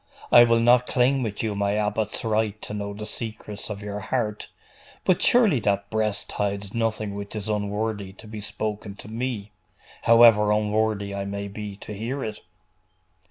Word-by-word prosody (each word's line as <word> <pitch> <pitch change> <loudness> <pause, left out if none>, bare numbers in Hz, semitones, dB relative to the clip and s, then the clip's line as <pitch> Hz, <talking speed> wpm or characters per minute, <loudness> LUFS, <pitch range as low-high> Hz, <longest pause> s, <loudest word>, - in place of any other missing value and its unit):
I 120 0 +9
will 115 0 +3
not 120 +1 +5
claim 130 +2 +2
with 110 -3 -3
you 110 -2 -1
my 100 0 0
abbot's 105 +1 -1
right 110 -1 0
to - - -6
know 100 -1 -4
the 105 +1 -6
secrets 110 -2 -6
of 100 -1 -6
your 105 0 -4
heart: 105 -1 -2 0.6
but 185 - +3
surely 220 - +5
that 100 -1 -1
breast 110 -2 -1
hides 100 -1 -2
nothing 110 -3 -1
which 100 +1 -7
is 105 -1 -4
unworthy 105 -1 -2
to 105 - -14
be 110 0 -7
spoken 105 -1 -4
to 105 - -11
me, 115 -2 -4 0.5
however 115 -3 +6
unworthy 105 -1 0
I 100 0 -3
may 100 0 -4
be 100 0 -7
to 105 - -8
hear 120 +7 -3
it! 110 -1 -5
105 Hz, 170 wpm, -25 LUFS, 100-115 Hz, 0.6 s, I